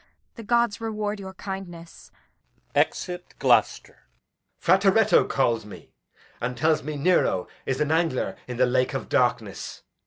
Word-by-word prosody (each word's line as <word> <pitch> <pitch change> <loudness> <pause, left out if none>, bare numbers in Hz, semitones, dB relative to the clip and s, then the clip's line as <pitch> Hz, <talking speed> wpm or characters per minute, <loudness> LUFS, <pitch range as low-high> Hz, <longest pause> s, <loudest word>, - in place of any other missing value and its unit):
The 230 - -10
gods 235 -1 +1
reward 215 -2 -3
your 190 -1 -8
kindness! 175 -4 -8 0.6
Exit 180 -1 -1
[Gloucester]. - - +1
Edg. - - -44
Frateretto 195 +4 +4
calls 120 -4 +1
me, 105 - -13 0.5
and 125 +1 -3
tells 155 0 +2
me 150 +1 -5
Nero 145 - +2 0.2
is 135 -1 -1
an 150 0 0
angler 160 -5 0
in 125 -1 -5
the 130 - +4
lake 125 +1 +1
of - - -4
darkness. - - -1
170 Hz, 135 wpm, -25 LUFS, 130-195 Hz, 0.6 s, Frateretto